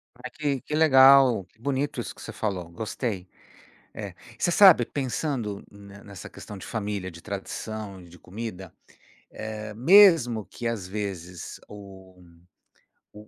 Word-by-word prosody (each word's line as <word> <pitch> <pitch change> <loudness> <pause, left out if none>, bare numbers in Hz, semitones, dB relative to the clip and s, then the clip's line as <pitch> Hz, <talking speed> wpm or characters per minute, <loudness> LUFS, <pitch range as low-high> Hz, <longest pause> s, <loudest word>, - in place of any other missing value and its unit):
Ai, - - -9
que 145 -4 -2
que 150 - -4
legal, 135 -6 +6
que 95 - -34
bonito 140 +3 -2
isso - - -8
que - - -14
você - - -7
falou, 95 -6 -3
gostei, 105 0 -4 0.7
é. 100 -4 -7 0.2
Você 175 - 0
sabe, 175 - +7
pensando, 125 -5 -3
ne 100 -1 -14
nessa 100 -2 -10
questão 105 - -10
de 95 - -10
família, 100 -4 -4
de 85 -1 -13
tradição, 100 0 -6
de 85 0 -16
comida, 95 -1 -8 0.6
eh, 110 -1 -7
mesmo 130 - +5
que, 120 - -6
às 110 -6 -3
vezes, 95 -4 -6
o 95 -2 -13 0.9
o 105 0 -14
105 Hz, 140 wpm, -26 LUFS, 95-130 Hz, 0.9 s, sabe